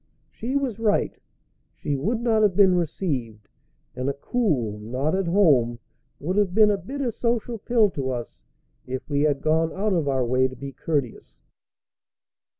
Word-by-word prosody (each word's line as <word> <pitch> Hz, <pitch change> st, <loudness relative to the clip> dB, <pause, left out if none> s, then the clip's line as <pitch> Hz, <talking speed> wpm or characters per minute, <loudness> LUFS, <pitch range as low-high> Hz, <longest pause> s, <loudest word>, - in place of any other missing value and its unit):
She 250 Hz, +4 st, -4 dB
was 260 Hz, -6 st, -1 dB
right. 215 Hz, -2 st, +1 dB, 0.6 s
She 145 Hz, -, -2 dB
would 220 Hz, -, -1 dB
not 225 Hz, -2 st, +2 dB
have 205 Hz, -4 st, +3 dB
been 190 Hz, -2 st, +6 dB
received, 140 Hz, -, -2 dB, 0.5 s
and 130 Hz, +2 st, -2 dB
a -, -, -1 dB
cool 140 Hz, -, -1 dB
"Not 130 Hz, +8 st, -2 dB
at 190 Hz, -1 st, 0 dB
home" 145 Hz, -, +3 dB, 0.4 s
would 185 Hz, +6 st, -2 dB
have 195 Hz, -3 st, +1 dB
been 215 Hz, -1 st, +6 dB
a 205 Hz, -, +1 dB
bitter 270 Hz, +2 st, -3 dB
social 235 Hz, 0 st, -2 dB
pill 220 Hz, -2 st, +2 dB
to 135 Hz, -5 st, -3 dB
us 120 Hz, -2 st, -6 dB, 0.4 s
if 130 Hz, 0 st, -5 dB
we 145 Hz, -1 st, 0 dB
had 145 Hz, -2 st, +1 dB
gone 160 Hz, +1 st, +2 dB
out 205 Hz, +1 st, -1 dB
of 165 Hz, -5 st, 0 dB
our 130 Hz, -2 st, +1 dB
way 130 Hz, +2 st, +2 dB
to 130 Hz, -, -10 dB
be 135 Hz, +2 st, -7 dB
courteous. 135 Hz, -2 st, -3 dB
165 Hz, 165 wpm, -24 LUFS, 130-210 Hz, 0.6 s, been